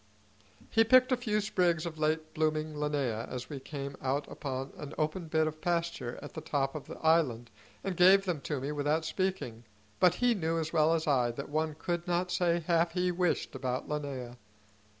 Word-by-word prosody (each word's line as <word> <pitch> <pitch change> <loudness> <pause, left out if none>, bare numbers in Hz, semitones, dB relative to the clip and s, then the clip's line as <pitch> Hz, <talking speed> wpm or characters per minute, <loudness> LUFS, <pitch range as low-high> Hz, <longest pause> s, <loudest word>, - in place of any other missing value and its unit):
He 225 - +5
picked 255 +3 +5
a - - +5
few 215 -4 0
sprigs 180 -6 +1
of 160 -2 -6
late 155 +1 0
blooming 155 -1 0
linnaea 145 -7 -1
as 125 +3 -6
we 140 - -4
came 140 0 -6
out 140 +2 -1
upon 135 -1 -4
an 150 0 -8
open 155 +3 -1
bit 160 0 +2
of 155 0 -4
pasture 170 -8 -1
at 145 - -9
the 160 - -6
top 140 -3 -1
of 155 - -7
the - - -8
island, 130 -8 +2 0.3
and 195 -2 -2
gave 190 +3 +6
them 175 -6 -1
to 145 0 -3
me 140 +3 -3
without 150 +2 0
speaking, 170 - -2 0.4
but 180 -1 +5
he 245 +3 +3
knew 165 -5 -1
as 160 0 -2
well 160 0 +4
as 160 - -1
I 130 -5 +3
that 140 +4 -6
one 155 +1 -1
could 175 +1 -3
not 180 +1 0
say 175 -1 +2
half 170 +1 +2
he 180 0 +1
wished 180 -1 0
about 130 -1 -3
linnaea. 135 -5 -4
155 Hz, 195 wpm, -31 LUFS, 140-175 Hz, 0.4 s, gave